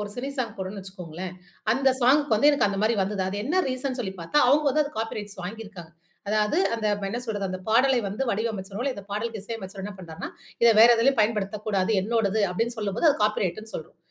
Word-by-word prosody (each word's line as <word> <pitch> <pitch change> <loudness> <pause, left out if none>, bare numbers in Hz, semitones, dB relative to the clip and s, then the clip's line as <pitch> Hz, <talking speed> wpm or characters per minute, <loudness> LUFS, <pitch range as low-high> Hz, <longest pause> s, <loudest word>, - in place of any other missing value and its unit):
ஒரு 205 - -6
cine 260 +3 -3
song 235 -4 -1
போடுறோன்னு 195 +1 -5
வச்சுக்கோங்களேன்! 180 -2 -7 0.4
அந்த 270 +3 +2
சாங்க்கு 280 +4 +4
வந்து 235 +8 +5
எனக்கு 285 -7 +2
அந்தமாரி 210 +3 +1
வந்தது. 195 0 -2
அது 195 - -4
என்ன 345 +9 +2
ரீசன்னு 255 0 -3
சொல்லி 195 -5 -3
பார்த்தா, 295 - +2
அவுங்க 295 +3 +4
வந்து 305 +3 +3
அது 285 - -6
காப்பி 225 0 -3
ரைட்ஸ் 205 -1 -8
வாங்கியிருக்காங்க. 200 -4 -8 0.4
அதாவது 215 +7 +2 0.2
அந்த 225 -1 -4 0.2
என்ன 230 +5 -3
சொல்றது, 205 -4 -2
அந்த 185 - -4
பாடலை 255 +4 +4
வந்து 210 +7 -3
வடிவமைச்சிரோம்ல. 215 +3 -2
இந்த 200 - -9
பாடலுக்கு 220 +1 -3
இசையமைச்சவரு 200 -3 -7
என்ன 205 0 -6
பண்றார்ன்னா, 165 -3 -7 0.3
"இத 235 - +8
வேற 230 - +9
எதிலேயும் 265 +3 +3
பயன்படுத்தக்கூடாது 210 -1 0
என்னோடது" 220 -1 +1
அப்பிடின்னு 230 +6 -2
சொல்லும்போது 215 - +1
அது - - 0
காப்பி 210 0 +1
ரைட்ன்னு 215 +5 -4
சொல்றோம். 160 - -7
215 Hz, 195 wpm, -25 LUFS, 195-240 Hz, 0.4 s, வேற